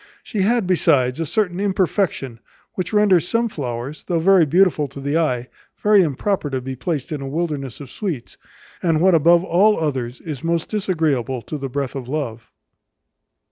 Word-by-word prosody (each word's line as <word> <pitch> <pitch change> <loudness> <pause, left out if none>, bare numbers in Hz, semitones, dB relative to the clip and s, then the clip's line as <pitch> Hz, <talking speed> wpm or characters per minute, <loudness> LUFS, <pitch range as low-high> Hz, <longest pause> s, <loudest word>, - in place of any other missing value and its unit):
She 210 -5 -3
had, 225 +2 +2
besides, 150 -7 +2
a 165 - -2
certain 185 -3 0
imperfection, 185 - 0 0.3
which 185 -2 -3
renders 200 -5 +4
some 230 +2 +1
flowers, 130 - -5
though 175 - 0
very 180 -1 +5
beautiful 170 -2 +3
to 140 +1 -10
the 140 +4 0
eye, 125 -7 0 0.4
very 210 -1 +6
improper 165 +2 -1
to 135 -1 -2
be 130 +1 -6
placed 150 +2 -3
in 150 -2 -3
a 135 - -5
wilderness 145 -4 -3
of 140 -4 -10
sweets, 170 - -5 0.5
and 165 -3 +2
what 185 +2 +4
above 170 +2 +5
all 195 +3 +3
others 130 -6 -2
is 150 -6 -7
most 170 0 -1
disagreeable 155 - -1
to - - -6
the 135 -2 -4
breath 140 0 -3
of 130 -3 -6
love. 120 -7 -4
160 Hz, 175 wpm, -21 LUFS, 135-185 Hz, 0.5 s, very